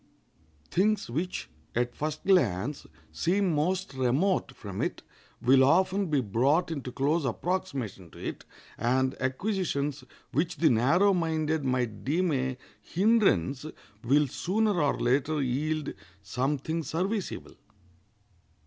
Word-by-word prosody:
Things 210 - +1
which, 175 +8 -3 0.3
at 120 0 0
first 155 +3 -4
glance, 140 - +2 0.2
seem 185 +1 +1
most 180 +3 0
remote 135 +9 +1
from - - -6
it - - -2 0.4
will 130 +2 +5
often 185 +7 +3
be 150 -4 +2
brought 130 - +2
into 140 -5 -4
close 145 +6 +1
approximation 135 - -3
to - - -16
it, - - -5 0.4
and 130 +2 +2
acquisitions 145 -1 -1 0.3
which 165 +3 0
the 160 - +4
narrow 170 - +4
minded 160 -3 0
might 125 -5 -1
deem 170 +5 +1
a 130 -2 -1 0.2
hindrance 180 - +2 0.4
will 145 +5 +4
sooner 200 - 0
or 145 - +1
later 145 +5 +1
yield 145 +3 -1 0.3
something 140 - -1
serviceable. 190 +6 -3
150 Hz, 115 wpm, -28 LUFS, 130-180 Hz, 0.4 s, will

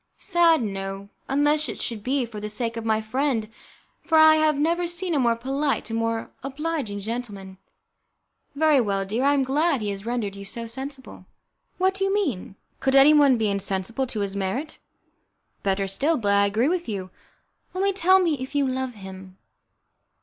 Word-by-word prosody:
"Sad, 335 -5 +3
no, 195 -1 -5 0.2
unless 295 +1 +2
it - - -6
should 225 -3 -4
be 260 +3 0
for 225 -2 -8
the 210 0 -5
sake 230 +2 -2
of 230 - -5
my 220 -1 +1
friend, 235 0 -1 0.6
for 320 - +2
I 315 0 +7
have 310 -1 +2
never 340 +4 +1
seen 345 +1 -2
a 295 - +2
more 235 -2 +2
polite 270 +2 -2
and 225 - -1
more 230 0 -2
obliging 275 -5 -3
gentleman." 200 -4 -6 1.0
"Very 300 -2 +4
well, 195 -3 -1
dear, 220 +6 -2
I 285 +1 +4
am 275 - +2
glad 290 +2 +1
he 210 -2 -2
has 195 0 -6
rendered 225 -4 -3
you 200 - -8
so 230 +4 -5
sensible." 265 +3 -7 0.5
"What 375 +1 +2
do 390 0 -2
you 390 - +1
mean? 290 - -2 0.2
Could 265 0 +1
anyone 280 -1 +6
be 220 -1 0
insensible 200 +6 -2
to 220 -4 -4
his 200 -1 -3
merit?" 200 +11 -3 0.8
"Better 195 0 0
still, 280 +12 0
but 205 -3 +1
I 200 0 +4
agree 220 +6 +1
with 345 -2 -1
you. 190 -3 -5 0.6
Only 395 +1 +1
tell 375 0 +5
me 335 -7 +1
if 260 +3 -7
you 285 -1 +2
love 260 -1 -3
him?" 190 -1 -11
250 Hz, 180 wpm, -24 LUFS, 205-300 Hz, 1.0 s, I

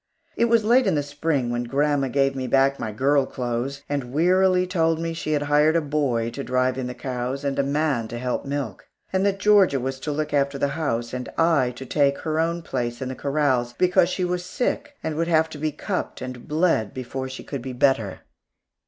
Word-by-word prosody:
It 235 - +3
was 230 -1 +3
late 240 +2 +4
in 185 - +2
the 145 - +1
Spring 145 -3 -1
when 120 0 -2
grandma 140 +2 +1
gave 135 +1 +1
back 135 +2 +3
my 110 - -3
"girl 135 +4 +2
clothes" 125 +3 -3
and 140 -4 -3
wearily 180 +4 +3
told 165 -3 +1
me 165 0 -2
she 155 -2 -3
had 145 -1 +1
hired 150 +2 +3
a 165 - +3
boy 140 -6 0
to 140 - -5
drive 130 0 0
in 125 - -3
the 125 - -6
cows, 130 +1 -4
and 140 -1 -1
a - - +3
man 140 -4 0
to 120 - -6
help 125 +1 -2
to 140 - -9
milk; 140 -9 -4 0.3
and 190 0 +2
that 195 -1 0
Georgia 200 -8 +4
was 130 +1 -3
to 150 +3 -3
look 150 +1 -2
after 140 -1 +1
the 140 - 0
house, 120 -6 -2
and 125 0 -4
I 160 -6 +3
to 130 - -8
take 140 +1 +2
her 155 -1 -1
own 170 +1 0
place 120 -4 -3
in 130 - -4
the 130 - -5
corrals, 140 -4 0
because 180 +3 +3
she 185 0 -1
was 180 0 -2
sick 255 +9 -2
and 160 - -2
would 165 +1 0
have 160 -1 +3
to 150 - -9
be 155 +1 -1
cupped 185 +5 -4
and 125 -1 -7
bled 155 - +1
before 130 +1 -4
she 130 - -8
could 140 -3 -5
be 130 +1 -6
better. 125 -6 +1
140 Hz, 225 wpm, -24 LUFS, 130-165 Hz, 0.3 s, late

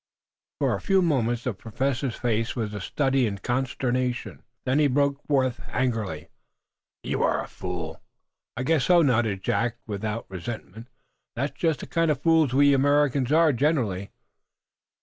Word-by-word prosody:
_" - - -68 0.5
For - - +1
a - - -3
few 195 -2 +3
moments 120 -7 +1
the 125 - -1
Professor's 130 +5 -2
face 115 -1 -1
was 110 -4 -3
a 105 - -5
study 135 +3 +1
in 100 -2 -3
consternation. 125 +2 -2 0.2
Then 130 +3 +2
he 150 - +5
broke 140 +1 +1
forth, 130 -4 +1
angrily: 110 -11 -1
"Ach! - - -26 0.7
You - - -2
are - - +1
a - - -9
fool!" 85 -3 -6 0.6
"I 130 - -1
guess 155 0 +2
so," 175 -2 +5
nodded 110 -8 +1
Jack, 115 0 0
without 105 +1 -4
resentment. 105 +4 -7 0.5
"That's 140 +5 -2
just 160 -4 0
the - - -6
kind 165 -1 +1
of 145 -3 +1
fools 160 -3 +3
we 140 +2 +5
Americans 140 -1 +2
are 160 -1 +5
generally." 115 - 0
125 Hz, 160 wpm, -25 LUFS, 110-145 Hz, 0.7 s, he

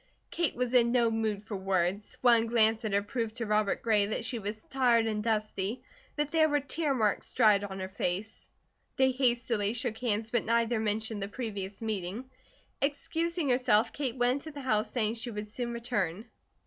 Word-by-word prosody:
Kate 340 -3 0
was 250 0 -1
in 235 -2 +5
no 235 -2 +3
mood 220 -2 -1
for 215 -1 -6
words; 190 +1 -1
one 235 -2 +5
glance 225 0 +3
at 215 - -2
her 200 0 +2
proved 225 0 -3
to 235 -1 -3
Robert 210 -1 +1
Gray 210 -3 +3
that 220 +2 -2
she 235 0 -2
was 210 +1 -5
tired 245 -4 +2
and 215 -1 -1
dusty, 215 0 -1 0.3
that 295 -1 -1
there 315 -1 +4
were 290 0 +2
tear 285 +1 -1
marks 215 -4 0
dried 210 -4 +5
on 195 -1 -5
her 185 - -3
face. 190 +2 -3 0.5
They 265 0 +4
hastily 240 -5 +1
shook 235 -2 -2
hands, 225 -2 -1
but 240 - +2
neither 230 0 +2
mentioned 220 0 -1
the 195 - -2
previous 200 -2 -5
meeting. 215 +4 -4 0.5
Excusing 320 +3 -1
herself 245 -3 +3
Kate 265 -4 -2
went 250 +5 +1
into - - -4
the 290 -1 -8
house 215 -5 +1
saying 220 -3 0
she 235 +1 -5
would 210 -2 -5
soon 235 +3 -4
return. 215 -5 -2
225 Hz, 185 wpm, -30 LUFS, 210-250 Hz, 0.5 s, in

